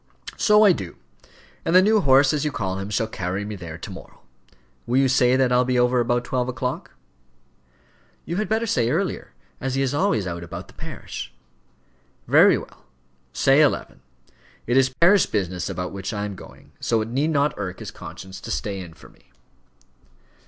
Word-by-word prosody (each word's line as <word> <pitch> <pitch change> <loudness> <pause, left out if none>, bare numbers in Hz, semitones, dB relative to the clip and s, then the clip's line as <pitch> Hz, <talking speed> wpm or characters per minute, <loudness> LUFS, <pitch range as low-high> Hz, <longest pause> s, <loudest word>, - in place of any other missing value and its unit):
"So 210 0 +5
I 205 - +7
do; 95 - -4 0.7
and 165 - 0
the - - +10
new 215 +1 +4
horse, 135 -1 +5
as 150 -1 -1
you 150 - -1
call 95 -6 -3
him, 95 +1 -5
shall 105 +2 0
carry 95 -2 -4
me 105 0 -5
there 85 -4 -8
to - - -8
morrow. - - -12 0.7
Will 125 +2 +1
you 135 0 +4
say 125 -1 +3
that 130 -1 +2
I'll 125 0 +4
be 125 0 0
over 125 0 +3
about 120 0 0
twelve 125 0 -1
o'clock?" 125 +1 -4 1.3
"You 170 - -3
had 215 - -2
better 220 +1 +1
say 120 - +1
earlier, - - -2 0.3
as 135 0 -3
he 135 - +1
is 135 0 -1
always 155 - +1
out 85 -1 -5
about 85 - -8
the - - -16
parish." 60 - -8 1.0
"Very - - +6
well, - - -12 0.5
say 135 - +4
eleven. 140 - 0 0.6
It 120 - 0
is 135 0 +4
parish 170 +9 +4
business 90 -4 -2
about 90 0 -4
which 100 +3 -5
I 105 0 -2
am 105 - -5
going, 95 - -14
so 115 -2 +1
it 110 - -3
need 140 +6 0
not 145 -1 +1
irk 95 -3 -5
his - - -8
conscience 95 0 -10
to - - -9
stay 95 +8 -3
in 85 -3 -9
for - - -16
me." - - -26
125 Hz, 190 wpm, -23 LUFS, 95-140 Hz, 1.3 s, the